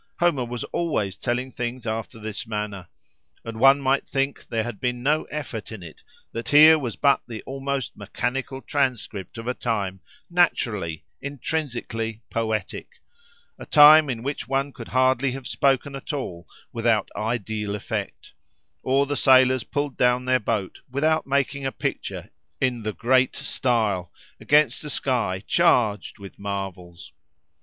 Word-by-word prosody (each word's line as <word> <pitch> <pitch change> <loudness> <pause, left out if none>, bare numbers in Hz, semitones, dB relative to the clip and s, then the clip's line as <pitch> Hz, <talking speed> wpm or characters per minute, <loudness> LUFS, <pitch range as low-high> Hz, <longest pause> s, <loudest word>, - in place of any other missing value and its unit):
Homer 170 -8 +2
was 120 0 -5
always 105 - -1
telling 125 +4 -2
things 125 0 -4
after 110 0 -4
this 110 +1 -6
manner. 105 -4 -4 0.6
And 115 -1 -6
one 135 +3 +7
might 135 0 0
think 135 0 -2
there 115 -1 -1
had 120 -3 -6
been 125 -1 -2
no 150 +3 +2
effort 130 -9 -6
in 110 -5 -8
it: 80 - -12 0.3
that 115 - -5
here 155 +2 +8
was 120 -6 -4
but 140 -1 +3
the 115 -3 -7
almost 135 -1 -3
mechanical 130 +6 -4
transcript 120 -7 -2
of 115 - -7
a 125 - +1
time, 100 -6 -2 0.3
naturally, 105 - 0 0.2
intrinsically, 125 -6 -4
poetic, 110 -3 -3 0.7
a - - -8
time 150 0 +8
in 120 -3 -3
which 140 +2 -4
one 135 +1 -1
could 115 - -9
hardly 130 0 +2
have 135 -1 -7
spoken 135 0 +1
at 135 - -6
all 90 - -5 0.3
without 115 -2 +1
ideal 105 -2 -2
effect, 105 - -5 0.5
or, 135 +2 +2
the 145 +1 -2
sailors 130 -2 +5
pulled 145 -2 -3
down 125 0 +2
their 130 0 +3
boat 105 -4 -2
without 155 +4 +1
making 140 0 0
a 135 - -1
picture - - -4 0.3
in 125 -2 0
"the 110 0 -3
great 130 +4 +2
style," 115 - 0 0.3
against 150 +2 +3
a 150 - -6
sky 115 -10 -1
charged 120 - +2
with 100 -2 -12
marvels. 95 -4 -6
125 Hz, 150 wpm, -24 LUFS, 110-140 Hz, 0.7 s, here